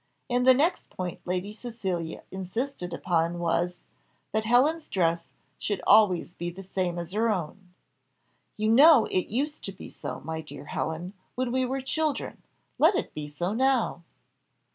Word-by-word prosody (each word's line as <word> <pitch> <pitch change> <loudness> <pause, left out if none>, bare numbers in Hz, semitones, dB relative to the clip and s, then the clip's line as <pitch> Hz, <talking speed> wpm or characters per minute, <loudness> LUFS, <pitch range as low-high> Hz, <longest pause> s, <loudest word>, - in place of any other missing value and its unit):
And 250 +1 +2
the 260 - +9
next 315 +7 +1
point 180 -2 -5
Lady 185 +3 -2
Cecilia 195 -8 -4
insisted 190 +2 -4
upon 170 -1 0
was, 175 +1 0 0.5
that 220 0 0
Helen's 290 +8 +3
dress 170 -3 +1 0.3
should 205 -2 -1
always 200 -5 +5
be 175 0 -4
the 185 +3 -9
same 180 -2 -2
as 170 0 -5
her 220 +3 +1
own. 180 -1 -4 0.8
"You 215 +1 +1
know 275 +2 +8
it 185 - 0
used 290 +7 -2
to 195 - -4
be 190 - -11
so, - - -6
my 160 +2 -4
dear 150 -1 -10
Helen, 160 +5 -3 0.2
when 255 -1 -1
we 260 +1 +1
were 265 +2 -2
children; 305 +2 -2 0.4
let 330 +6 +6
it - - -2
be 150 -1 -5
so 175 +6 -2
now." 255 -6 +2
195 Hz, 160 wpm, -27 LUFS, 175-250 Hz, 0.8 s, the